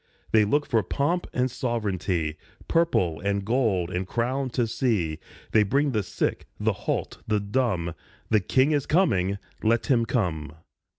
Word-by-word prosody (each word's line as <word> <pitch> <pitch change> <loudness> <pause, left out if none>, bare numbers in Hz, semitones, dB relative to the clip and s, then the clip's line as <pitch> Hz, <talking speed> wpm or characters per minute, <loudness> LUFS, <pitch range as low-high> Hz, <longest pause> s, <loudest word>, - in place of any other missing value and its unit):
They 110 -1 +5
look 145 +7 +1
for 115 -3 +2
pomp 155 - -1
and 125 0 0
sovereignty, 95 -10 -1 0.3
Purple 95 - +2
and 100 0 0
gold 105 -7 +1
and 90 +1 -2
crown 130 +4 -1
to 120 -1 0
see, 105 - 0 0.3
They 110 - +5
bring 140 +8 +2
the 110 -4 +1
sick, 95 - -2
the - - +1
halt, - - -3
the 105 -1 +2
dumb. 100 -6 0 0.4
The 110 - +5
King 130 +9 +2
is 145 -3 0
coming! 100 - +2 0.2
Let 115 +1 +2
him 115 -3 +3
come. 80 - -1
110 Hz, 155 wpm, -26 LUFS, 95-130 Hz, 0.4 s, They